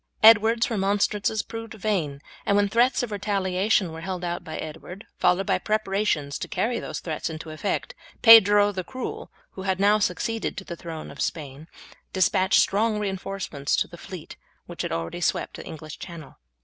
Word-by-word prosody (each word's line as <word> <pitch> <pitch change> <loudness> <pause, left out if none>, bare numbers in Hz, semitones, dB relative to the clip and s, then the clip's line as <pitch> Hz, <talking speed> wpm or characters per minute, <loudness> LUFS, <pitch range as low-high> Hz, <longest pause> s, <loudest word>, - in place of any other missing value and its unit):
Edward's 225 +2 +6
remonstrances 205 +1 +1
proved 225 -1 -8
vain, 170 -10 -2 0.2
and 200 - +2
when 205 0 +3
threats 240 +5 +2
of 240 - -4
retaliation 195 -2 0
were 160 0 -8
held 180 0 -4
out 175 0 -3
by 155 - -6
Edward, 165 +5 -8
followed 190 +2 +3
by - - +1
preparations 195 -9 -1
to - - -4
carry 235 +1 -1
those - - -5
threats 160 -1 -3
into 160 0 -7
effect, 155 +6 -3 0.3
Pedro 205 -3 +8
the 185 -2 -4
Cruel, 255 +9 -6 0.2
who 190 - -8
had 190 0 -1
now 205 +2 +4
succeeded 225 +3 -1
to 195 - -5
the 175 - -7
throne 165 -2 -8
of 140 - -8
Spain, 150 -1 -4 0.5
despatched 185 0 +3
strong 215 +2 +1
reinforcements 190 -7 -2
to - - 0
the 175 - -12
fleet 175 -1 -10 0.3
which - - -6
had - - -3
already 85 - -3
swept - - -1
the - - -9
English 155 -1 -9
Channel. 165 -5 -9
195 Hz, 175 wpm, -25 LUFS, 165-210 Hz, 0.5 s, Pedro